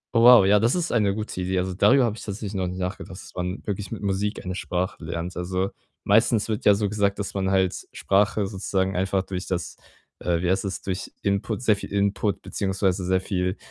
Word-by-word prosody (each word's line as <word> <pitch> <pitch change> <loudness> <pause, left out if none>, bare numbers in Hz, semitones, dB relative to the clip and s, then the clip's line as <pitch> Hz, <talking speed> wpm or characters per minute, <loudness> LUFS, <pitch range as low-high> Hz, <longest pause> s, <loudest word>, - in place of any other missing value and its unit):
Oh 115 - +5
wow, 120 -5 +9
ja, 105 +1 +5
das 115 - +2
ist 175 -2 -1
eine 105 -4 +2
gute 105 -4 -4
Idee. 95 +1 -1
Also, 90 0 -1
darüber 130 +7 +5
habe 110 -2 -1
ich - - -10
tatsächlich 100 0 -5
noch 95 -2 -1
nicht 90 +1 -5
nachgedacht, 90 0 -5
dass - - -13
man 90 +1 -4
wirklich 100 -2 -3
mit - - -6
Musik 100 +1 -1
eine 90 - -3
Sprache 90 -1 -3
lernt. 85 +2 -4
Also, 95 +2 -2 0.3
meistens 110 +1 +3
wird 110 - -2
ja 105 - +7
so 105 0 0
gesagt, 100 -1 0
dass 100 - -4
man 95 -1 -1
halt 95 -1 0
Sprache 100 +1 +2
sozusagen 95 -1 -1
einfach 95 +1 0
durch 95 0 -5
das 85 -2 -3 0.4
äh, 85 -1 0
wie 90 - +2
heißt 95 +1 0
das, 95 - -4
durch 95 -1 -4
Input 100 +4 -1
sehr 105 -3 +4
viel - - -8
Input 100 0 0
beziehungsweise 95 -1 -1
sehr 95 0 +2
viel, 90 -1 -1
95 Hz, 220 wpm, -24 LUFS, 95-105 Hz, 0.4 s, wow